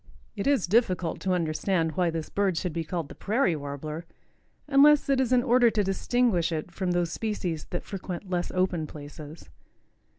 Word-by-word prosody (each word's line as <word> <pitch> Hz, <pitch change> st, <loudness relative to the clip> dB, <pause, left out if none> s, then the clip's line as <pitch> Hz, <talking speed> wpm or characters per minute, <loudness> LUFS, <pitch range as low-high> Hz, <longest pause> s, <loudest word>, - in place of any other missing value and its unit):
It 205 Hz, +4 st, -2 dB
is 280 Hz, -8 st, +3 dB
difficult 185 Hz, -5 st, +1 dB
to 185 Hz, -1 st, 0 dB
understand 165 Hz, 0 st, 0 dB
why 175 Hz, +2 st, +1 dB
this 160 Hz, -2 st, -4 dB
bird 195 Hz, -4 st, +1 dB
should 175 Hz, 0 st, -2 dB
be 165 Hz, 0 st, -2 dB
called 165 Hz, -1 st, -4 dB
the -, -, -10 dB
Prairie 210 Hz, -4 st, +1 dB
Warbler, 150 Hz, +3 st, -6 dB, 0.6 s
unless 290 Hz, +1 st, +6 dB
it 270 Hz, -1 st, +3 dB
is 255 Hz, -2 st, 0 dB
in 250 Hz, -1 st, +4 dB
order 245 Hz, -1 st, +5 dB
to 215 Hz, -2 st, 0 dB
distinguish 195 Hz, -2 st, +1 dB
it 160 Hz, +2 st, -3 dB
from 185 Hz, +1 st, -3 dB
those 175 Hz, -1 st, 0 dB
species 185 Hz, -8 st, -3 dB
that 175 Hz, -, -5 dB
frequent 190 Hz, -1 st, -6 dB
less 180 Hz, -1 st, -1 dB
open 185 Hz, -4 st, 0 dB
places. 150 Hz, -, -11 dB
180 Hz, 175 wpm, -27 LUFS, 160-215 Hz, 0.6 s, unless